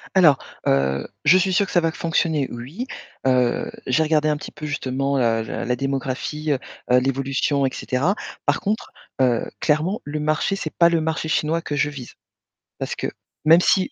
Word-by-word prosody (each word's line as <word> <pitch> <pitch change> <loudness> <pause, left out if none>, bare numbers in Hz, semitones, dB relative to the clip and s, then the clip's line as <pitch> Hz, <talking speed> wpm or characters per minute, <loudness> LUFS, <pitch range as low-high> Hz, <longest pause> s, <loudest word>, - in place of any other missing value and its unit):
Alors, 160 -8 +6 0.3
heu, 70 0 +1 0.2
je 185 - +7
suis 185 0 +1
sûre 200 +3 +3
que - - -8
ça 175 - +4
va 165 -1 +1
fonctionner, 160 -4 0
oui. 135 - -6 0.4
Heu, 125 -2 +2 0.2
j'ai 130 +5 +3
regardé 155 -1 +2
un 150 - +2
petit 150 - -8
peu 155 - -8
justement, 135 -1 -1
heu, 115 -3 +2
la - - -4
la 125 +1 0
démographie, 135 +3 -2
heu, 135 - +1 0.3
heu, 125 - +7
l'évolution, 135 +2 0
et 130 - 0
cetera. 145 +10 0 0.3
Par - - +2
contre, 215 +2 -2 0.3
heu, 125 -3 +2
clairement, 165 +9 +1
le 150 +1 -4
marché, 155 +6 0
c'est 155 - -5
pas 170 -1 +6
le 170 -1 +2
marché 160 0 -2
chinois 160 +1 +1
que 145 -2 -3
je 145 - +2
vise. 135 -5 -9 0.6
Parce - - -3
que, - - -3 0.4
même 165 +3 +7
si, 190 +8 +2
150 Hz, 190 wpm, -22 LUFS, 130-165 Hz, 0.6 s, je